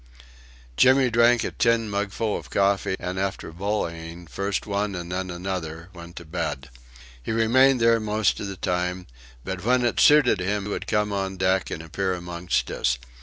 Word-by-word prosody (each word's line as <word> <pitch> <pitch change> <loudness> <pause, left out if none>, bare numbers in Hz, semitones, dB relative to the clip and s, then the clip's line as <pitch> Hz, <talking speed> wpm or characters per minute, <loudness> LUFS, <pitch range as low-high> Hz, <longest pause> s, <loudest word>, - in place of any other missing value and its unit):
Jimmy 130 -1 +5
drank 120 0 +4
a - - -3
tin 115 -1 +2
mugful 105 +1 -2
of - - -7
coffee, 100 -1 +1
and, 90 +1 -4
after 95 -4 -3
bullying 85 -2 -4
first 100 +4 -3
one 100 -1 -2
and 85 0 -6
then 95 +1 -3
another, 85 -2 -5
went 85 -1 -11
to 85 - -9
bed. 80 -5 -4 0.5
He - - -4
remained 125 +4 +4
there 115 0 +4
most 110 0 0
of 100 - -4
the 95 -1 -6
time, 90 0 -2 0.4
but 95 -1 -4
when 125 +2 +2
it 120 - 0
suited 145 -9 +5
him 100 +2 -1
would - - -4
come 105 -1 0
on 95 -1 -2
deck 95 +1 +1
and 80 - -5
appear 95 +3 -2
amongst 90 0 -2
us. 60 -1 0
95 Hz, 170 wpm, -24 LUFS, 90-110 Hz, 0.5 s, Jimmy